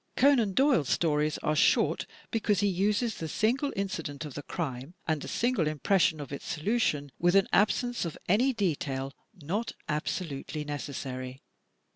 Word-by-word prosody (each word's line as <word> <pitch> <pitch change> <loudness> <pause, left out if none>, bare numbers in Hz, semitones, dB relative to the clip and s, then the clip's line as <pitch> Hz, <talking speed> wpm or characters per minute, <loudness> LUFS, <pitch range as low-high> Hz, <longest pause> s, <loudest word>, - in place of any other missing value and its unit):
Conan 250 -8 +4
Doyle's 265 - +3
stories 150 -2 +1
are 155 - +1
short - - +3 0.2
because 210 -3 +1
he 205 - +3
uses 205 +5 +1
the 160 - -3
single 250 - +1
incident 165 -7 -3
of 145 - -7
the 145 - -5
crime 140 -1 -5
and 155 -3 0
the - - -6
single 235 -9 +1
impression 160 +2 +2
of 145 -1 -7
its 140 - -6
solution, 150 - 0
with 175 +2 +3
an 195 0 +5
absence 240 +4 +2
of 165 -3 -4
any 235 +9 +4
detail 140 - -2 0.2
not 195 +7 -3
absolutely 150 -1 -3
necessary. 130 -3 -5
165 Hz, 150 wpm, -29 LUFS, 145-210 Hz, 0.2 s, an